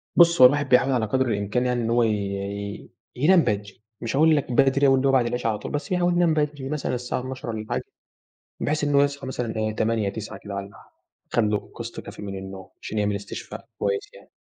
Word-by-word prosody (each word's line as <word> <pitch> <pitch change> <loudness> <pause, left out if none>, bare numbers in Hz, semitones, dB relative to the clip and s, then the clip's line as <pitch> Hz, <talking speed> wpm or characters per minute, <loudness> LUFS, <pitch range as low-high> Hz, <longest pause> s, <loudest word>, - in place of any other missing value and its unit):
بُص 170 -3 +6
هو 125 - +12
الواحد 145 0 -1
بيحاول 125 +2 +4
على 120 -4 +1
قدر 130 +4 +1
الإمكان 105 +3 0
يعني 125 -1 0
إن 115 - -1
هو 120 +1 +3
ي 115 - +2
ي 100 0 -4 0.2
ينام 170 +8 +5
بدري، 100 0 -3 0.2
مش 115 +2 -3
هاقول 155 +2 +5
لك 140 -3 -1
بدري 135 +2 +4
أوي 135 - +5
إللي 135 +1 +1
هو - - +4
بعد 130 -3 +3
العشا 120 -1 -1
على 105 - -1
طول، - - -6
بس 150 +6 -4
يحاول 180 -1 +2
ينام 175 -2 +3
بدري، 145 -3 -1
مثلًا 150 -4 -2
الساعة 125 +1 -3
24:00 130 -1 -6
والًا 110 -1 -4
حاجة، - - -1 0.8
بحيث 150 0 0
إن 145 -1 0
هو 140 - +6
يصحى 140 -1 -1
مثلًا 120 -3 -3
إيه 110 0 -1
08:00 110 -2 +1
09:00 105 0 -6
كده 100 0 -8
والّا 100 0 -6
ح - - -19 0.4
خَد 120 - +3
لُه 105 -1 -1
قسط - - -6
كافي - - -10
من 100 -1 -5
النوم، 95 0 -9
عشان 110 - -4
يعمل 105 -1 +1
استشفاء 100 - -8
كويس 100 0 -2
يعني، - - -16
120 Hz, 235 wpm, -24 LUFS, 105-140 Hz, 0.8 s, هو